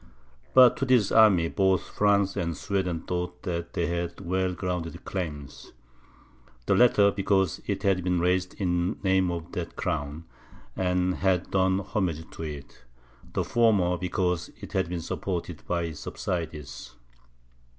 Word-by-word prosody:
But 130 -2 +8
to 135 - 0
this 125 -5 +3
army, 100 -7 +6
both 95 +1 +2
France 100 -1 +2
and 85 -4 -2
Sweden 90 -5 -2
thought 90 0 -4
that 85 -3 -4
they 85 - 0
had 85 0 -3
well 95 0 -1
grounded 90 -2 -4
claims; 75 -8 -6 0.9
the - - +2
latter, 105 -5 +5
because 95 -3 +1
it - - -2
had 95 -2 +2
been 90 -1 +1
raised 90 +1 0
in 90 -3 0
name 95 -1 +3
of 85 -1 -5
that 85 -2 -5
crown, 75 -2 -3 0.5
and 90 0 0
had 95 -2 0
done 95 0 +2
homage 90 -5 -2
to - - -9
it; 75 -5 -8 0.5
the - - 0
former, 105 -7 +3
because 90 -1 -1
it - - -10
had 80 - 0
been 90 -1 -3
supported 90 +1 -4
by 85 -1 0
its 80 -3 -5
subsidies. 75 -7 -5
90 Hz, 145 wpm, -27 LUFS, 85-95 Hz, 0.9 s, But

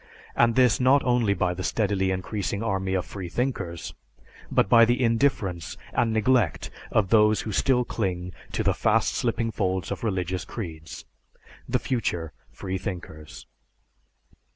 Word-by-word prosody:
And 115 -1 +3
this 125 -3 +4
not 130 +3 +4
only 120 -5 +2
by 90 -1 0
the 90 - -6
steadily 95 -1 0
increasing 100 +2 -3
army 95 -3 -1
of 95 - -1
freethinkers, 95 -2 -4 0.6
but - - +3
by 115 +3 +7
the 120 +2 +3
indifference 115 - 0 0.2
and 120 -1 +1
neglect 110 -4 +1 0.2
of 105 -4 +2
those 105 0 +4
who 110 - -5
still 125 +4 +2
cling 90 -6 -3 0.2
to - - -1
the - - +2
fast - - +1
slipping 115 -1 -1
folds 95 -3 -2
of - - -4
religious 95 -4 -1
creeds 80 -8 -8 0.6
the - - +2
future 90 - -2 0.2
freethinkers. 90 -5 -6
100 Hz, 135 wpm, -25 LUFS, 90-115 Hz, 0.6 s, by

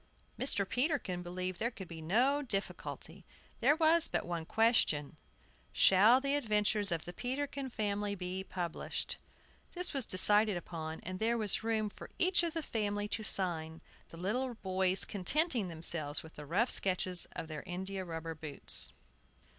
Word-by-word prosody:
Mr. 205 -7 +2
Peterkin 250 - 0
believed 180 0 -4
there 235 - +1
could 195 -6 -9
be 165 -1 -8
no 245 - +2
difficulty, 205 -8 -4 0.4
there 275 +5 +4
was 325 +1 +5
but - - -1
one 170 -2 -3
question: 220 -11 +2 0.6
Shall 210 +7 +6
the 275 +1 0
adventures 210 -6 +2
of 165 -2 -1
the 175 - -7
Peterkin 270 +4 -3
family 205 -2 -2
be 185 0 -4
published? 175 -3 -4 0.5
This 360 0 -3
was 270 -4 0
decided 205 +1 +5
upon, 160 -2 -6
and 185 0 -6
there 230 +2 +1
was 215 -1 +1
room 220 -1 0
for - - -11
each 365 -1 +4
of 335 -1 -2
the 325 - -1
family 205 -4 -1
to 220 - -2
sign, 165 -6 -1 0.3
the 165 - -11
little 240 +8 -1
boys 190 -2 +2
contenting 235 - 0
themselves 160 -3 -2
with 160 -1 -12
rough 180 - 0
sketches 185 -1 +2
of - - -5
their 155 -1 -6
india 190 +1 -4
rubber 165 -2 -5
boots. 155 - -3
200 Hz, 155 wpm, -33 LUFS, 175-240 Hz, 0.6 s, Shall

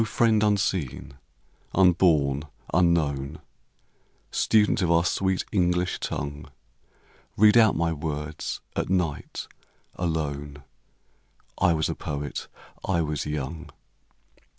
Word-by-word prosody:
friend 110 0 +2
unseen, 95 - 0 0.6
unborn, 85 -7 +4 0.3
unknown, 80 -5 +1 0.9
Student 110 -1 +3
of 90 - +1
our 85 0 +4
sweet 95 +1 0
English 90 -2 +1
tongue, 70 +1 -4 0.9
Read 105 +2 +6
out 110 -3 +6
my 85 0 +1
words 75 -1 -4
at - - -2
night, 90 -5 -2 0.5
alone: 75 -4 -3 1.0
I 90 -2 +4
was 80 -1 0
a - - -2
poet, 70 -1 -5 0.4
I 85 -3 +1
was 75 -2 -2
young. 75 +2 -4
85 Hz, 100 wpm, -26 LUFS, 75-95 Hz, 1.0 s, Read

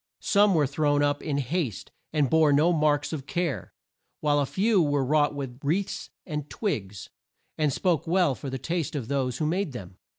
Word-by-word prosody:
Some 205 -2 +4
were 150 -3 +3
thrown 145 +1 +1
up 145 0 +1
in 145 -3 -2
haste 140 - -2 0.2
and 150 -3 +2
bore 155 +2 +4
no 155 +5 +4
marks 150 -1 +1
of 140 -4 -5
care, 175 -7 -2 0.5
while 145 -1 +2
a 140 - 0
few 200 - +2
were 145 -3 +1
wrought 145 +1 +2
with 135 -3 -6
wreaths 180 +8 -1 0.2
and 150 -3 -5
twigs, 105 - -4 0.4
and 150 -2 +1
spoke 165 +1 0
well 175 -4 +3
for 135 +2 -7
the 135 - -3
taste 165 +2 -3
of 125 -6 -4
those 130 -3 -1
who 155 - -1
made 175 -1 -1
them. 95 -6 -9
145 Hz, 190 wpm, -26 LUFS, 140-165 Hz, 0.5 s, Some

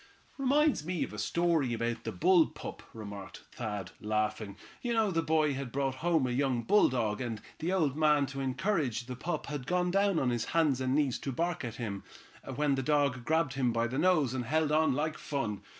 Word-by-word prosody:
"Reminds 280 - +3
me 175 +1 -1
of - - -5
the - - -7
story 165 -7 +1
of 115 0 -2
the - - -2
bull 175 -1 +4
pup," - - -8
remarked 100 -3 -9
Thad, 105 -6 -5
laughing. 105 -1 -2 0.2
"You 240 -1 -1
know, 220 -3 +2
the 165 -2 +1
boy 155 -2 +2
had 135 -2 -5
brought 135 0 0
home 165 -4 +2
a 125 - -1
young 125 -2 0
bulldog, 120 - +2
and 115 -4 -3 0.2
the 165 +3 -1
old 160 -8 +1
man, 150 -2 +3
to 135 0 -6
encourage 135 - -1
the 125 0 -6
pup, 170 +8 -3
had 140 -3 -5
gone 180 0 +1
down 195 -1 +2
on 130 -5 +1
his 120 -2 -1
hands 145 -6 +3
and 130 +1 +1
knees 145 -4 +1
to 135 - -4
bark 170 +4 -1
at 115 -2 -5
him, 105 -5 -5 0.5
when 145 +1 +2
the 135 - 0
dog 140 -2 +1
grabbed 160 -3 +1
him 130 -3 +1
by 115 0 +1
the 130 +4 -2
nose 155 -7 +3
and 125 -2 -2
held 155 +4 +1
on 155 -2 +3
like 155 +2 -2
fun. 115 -9 -3
140 Hz, 210 wpm, -31 LUFS, 120-165 Hz, 0.5 s, bull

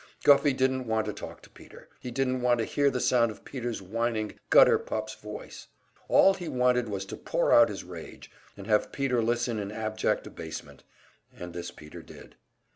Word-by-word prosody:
Guffey 140 0 +6
didn't 130 -1 0
want 110 -1 0
to 105 - -3
talk - - -9
to - - -16
Peter, - - -15
he 125 - -7
didn't 130 0 -1
want 120 -1 +3
to 115 - -1
hear 145 -1 +2
the 130 - -2
sound 120 -2 +3
of 110 - -11
Peter's 120 -6 -5
whining 110 +2 -2 0.2
gutter - - +7
pup's 110 0 -4
voice. 105 -1 -10 0.4
All 195 - +6
he 180 -3 -7
wanted 125 -2 +1
was 95 -1 -4
to - - -7
pour - - -1
out - - +7
his - - -6
rage, - - -11 0.3
and 100 - -9
have 105 0 +1
Peter 130 -4 0
listen 120 0 0
in 100 0 -4
abject 110 0 -1
abasement, 80 -3 -9 0.5
and 90 0 -8
this 85 0 -5
Peter 75 -3 -12
did. - - -14
115 Hz, 190 wpm, -28 LUFS, 105-125 Hz, 0.5 s, gutter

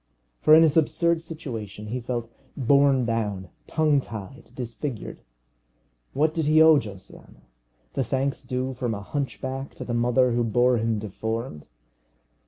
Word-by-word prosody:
For 155 - +7
in 160 - +7
his 160 -1 +3
absurd 170 +1 +2
situation 115 - -7
he 125 +3 -2
felt 120 -1 -4 0.3
borne 140 -1 +4
down, 105 -5 -2 0.2
tongue 150 -3 +2
tied, 110 +1 -9
disfigured. 125 0 -6 0.9
What 155 +3 +2
did 160 -2 -1
he 155 +1 +5
owe 160 -2 +7
Josiana? 100 -6 -12 0.5
The - - 0
thanks 135 +3 -2
due 130 +1 -3
from 120 -3 -2
a 100 - -6
hunchback 135 +1 -4
to - - -7
the 120 - -3
mother 125 +2 +3
who 120 0 +1
bore 120 +2 +3
him 115 0 0
deformed. 110 - -5
125 Hz, 145 wpm, -25 LUFS, 115-140 Hz, 0.9 s, For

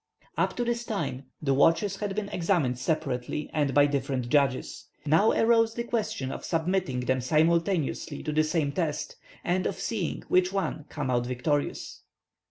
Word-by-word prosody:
Up - - 0
to 245 - 0
this 240 0 -1
time 140 - -3 0.2
the 135 -2 +2
watches 165 +8 +3
had 200 -1 -3
been 210 -1 -2
examined 165 -10 0
separately 135 0 -2
and 145 -3 +1
by 145 +2 +5
different 135 -3 -1
judges. 135 -1 +1 0.2
Now 160 +9 +4
arose 225 0 +3
the 235 - -2
question 215 - -2
of - - -6
submitting 165 -5 0
them 130 +1 0
simultaneously 160 +1 +1
to 155 - -2
the 155 +1 +3
same 155 -2 0
test, 155 -1 -2 0.3
and 185 +1 +1
of 195 - -2
seeing 205 -8 -2
which 185 0 +3
would 190 -6 -2
come 140 -4 -3
out 120 -1 +1
victorious. 145 +4 -2
155 Hz, 165 wpm, -28 LUFS, 135-195 Hz, 0.3 s, by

